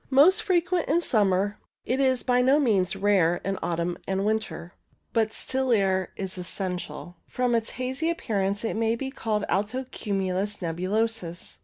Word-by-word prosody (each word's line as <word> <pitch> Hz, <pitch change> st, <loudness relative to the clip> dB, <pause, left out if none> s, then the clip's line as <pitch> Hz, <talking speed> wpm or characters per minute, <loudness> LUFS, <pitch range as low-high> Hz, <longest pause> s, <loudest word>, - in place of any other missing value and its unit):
Most 315 Hz, +10 st, +6 dB
frequent 360 Hz, -2 st, +1 dB
in 320 Hz, +4 st, +4 dB
summer, 205 Hz, -, +1 dB, 0.3 s
it 255 Hz, +2 st, 0 dB
is 260 Hz, -2 st, +2 dB
by 250 Hz, -1 st, +3 dB
no 265 Hz, +4 st, +4 dB
means 200 Hz, -10 st, +2 dB
rare 190 Hz, -4 st, +3 dB
in 195 Hz, 0 st, -1 dB
autumn 170 Hz, +1 st, -2 dB
and 195 Hz, +1 st, 0 dB
winter, 215 Hz, -5 st, -2 dB, 0.4 s
but 220 Hz, -2 st, +2 dB
still 260 Hz, +2 st, -1 dB
air 190 Hz, -4 st, +2 dB
is 190 Hz, -1 st, -4 dB
essential. 180 Hz, -1 st, -5 dB
From 250 Hz, -1 st, 0 dB
its 225 Hz, -1 st, +1 dB
hazy 260 Hz, +6 st, -1 dB
appearance 205 Hz, -11 st, -1 dB
it 225 Hz, -, -1 dB
may 225 Hz, +1 st, +1 dB
be 265 Hz, +3 st, -4 dB
called 215 Hz, -6 st, -1 dB
alto 220 Hz, +7 st, -1 dB
cumulus 195 Hz, 0 st, -1 dB
nebulosus. 185 Hz, +1 st, -2 dB
210 Hz, 155 wpm, -26 LUFS, 190-255 Hz, 0.4 s, Most